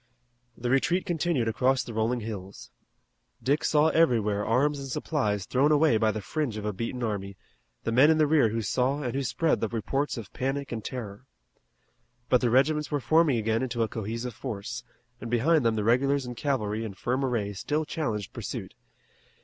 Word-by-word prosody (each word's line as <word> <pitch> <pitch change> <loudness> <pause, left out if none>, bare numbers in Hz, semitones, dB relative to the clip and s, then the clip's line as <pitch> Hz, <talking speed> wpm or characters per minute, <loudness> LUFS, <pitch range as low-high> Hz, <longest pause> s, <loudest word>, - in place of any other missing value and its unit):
The 120 +1 -2
retreat 170 +7 +2
continued 165 -7 0
across 130 +4 +2
the 120 - -8
rolling 115 +3 0
hills. 100 -3 -7 0.7
Dick 140 +3 +1
saw 155 +1 +4
everywhere 110 -10 +2
arms 140 +6 +1
and 135 - -6
supplies 110 - -1
thrown 140 +4 +2
away 150 -5 +4
by 110 0 +2
the 110 -1 -3
fringe 145 -6 -2
of 105 - -5
a 105 - -1
beaten 115 +5 -4
army, 100 -3 -3 0.5
the 115 - -1
men 130 +6 +6
in 160 - +4
the 155 - +4
rear 145 -6 +4
who 115 +1 -2
saw 130 +6 0
and 125 - -2
who 135 - -1
spread 160 +5 +1
the 115 - 0
reports 135 +6 -2
of 110 -5 -8
panic 135 +2 -2
and 115 -3 -4
terror. 120 -1 -7 1.0
But 125 - +4
the 125 - +2
regiments 150 +5 +2
were 145 - 0
forming 155 -1 +3
again 110 0 0
into 120 -3 -1
a - - 0
cohesive 115 +3 -4
force, 120 0 -5 0.4
and 120 - -6
behind 140 +6 +3
them 115 -1 +2
the 105 - -1
regulars 135 +4 +2
and 125 0 -6
cavalry 115 -5 -1
in 105 -4 -6
firm 125 +6 -1
array 115 -6 -1
still 150 +10 -2
challenged 115 -11 -3
pursuit. - - -6
125 Hz, 190 wpm, -27 LUFS, 110-140 Hz, 1.0 s, men